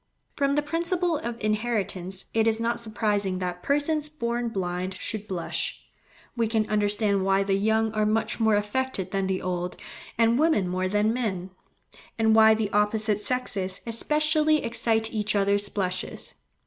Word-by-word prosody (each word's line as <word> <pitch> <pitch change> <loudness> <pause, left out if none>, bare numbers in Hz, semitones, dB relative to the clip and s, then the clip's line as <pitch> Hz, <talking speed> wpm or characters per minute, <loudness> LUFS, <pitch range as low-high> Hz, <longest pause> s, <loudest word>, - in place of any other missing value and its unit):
From 280 -1 +1
the 295 - +1
principle 340 +2 0
of 235 0 -5
inheritance 205 -4 -2
it 225 0 +2
is 225 0 +2
not 235 +1 0
surprising 210 -4 -1
that 180 -1 -4
persons 295 - 0
born 240 -5 -2
blind 185 -2 -3
should 215 +2 -3
blush. 180 -5 -2 0.6
We 230 -2 +1
can 220 -1 0
understand 205 -1 +2
why 195 0 +2
the 195 0 0
young 220 +2 +1
are 215 -1 +1
much 225 +2 0
more 220 -2 +3
affected 210 0 -1
than 195 -1 0
the 190 -1 -2
old, 180 -1 -3 0.4
and 230 +2 +3
women 310 - +3
more 185 +1 -1
than 210 +3 +1
men; 190 -7 -3 0.7
and 220 -1 +3
why 220 0 +7
the 215 -2 -2
opposite 210 0 +1
sexes 200 -6 -1
especially 305 +5 +2
excite 225 -1 0
each 215 -1 -1
other's 200 0 +1
blushes. 185 -2 -4
215 Hz, 155 wpm, -26 LUFS, 195-235 Hz, 0.7 s, why